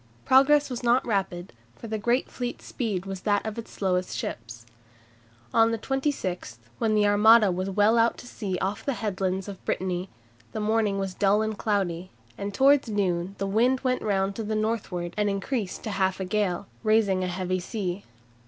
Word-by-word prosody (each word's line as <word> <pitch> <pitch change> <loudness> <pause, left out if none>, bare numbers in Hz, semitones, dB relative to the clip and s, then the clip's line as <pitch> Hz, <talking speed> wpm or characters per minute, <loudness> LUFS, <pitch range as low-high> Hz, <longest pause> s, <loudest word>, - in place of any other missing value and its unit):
Progress 285 +3 +5
was 250 -3 -5
not 240 +1 +3
rapid, 190 -5 -2 0.2
for - - -11
the 220 -1 -3
great 240 +5 +1
fleet's 245 -1 -5
speed 205 -7 -3
was 195 -1 -6
that 205 -1 +1
of 220 +1 -4
its 230 - -8
slowest 185 -2 -1
ships. 115 +1 -6 0.9
On 225 0 +5
the 230 - 0
26th, 225 - -2 0.2
when 220 -1 +2
the 210 -1 +4
Armada 210 0 +6
was 185 +2 -2
well 210 +4 +3
out 230 +1 +3
to - - -11
sea 200 -6 -4
off 195 +3 -2
the 275 - -1
headlands 190 -3 -2
of 200 -2 -8
Brittany, 185 0 -2 0.4
the - - -3
morning 215 -1 +1
was 195 -1 -2
dull 205 +2 +2
and 220 0 -2
cloudy, 185 -4 -1 0.3
and 200 0 -4
towards 275 +2 +4
noon 190 -2 -1
the 195 - -2
wind 240 +6 +2
went 255 -1 0
round 195 -1 0
to 225 - -3
the 215 +1 -2
northward 215 -6 -2
and 210 -1 +2
increased 200 0 -3
to 215 - -3
half 190 -1 0
a 190 - -2
gale, 200 -1 -1 0.2
raising 215 -4 +2
a - - -1
heavy 185 0 -2
sea. 190 -1 -4
205 Hz, 185 wpm, -26 LUFS, 185-225 Hz, 0.9 s, Armada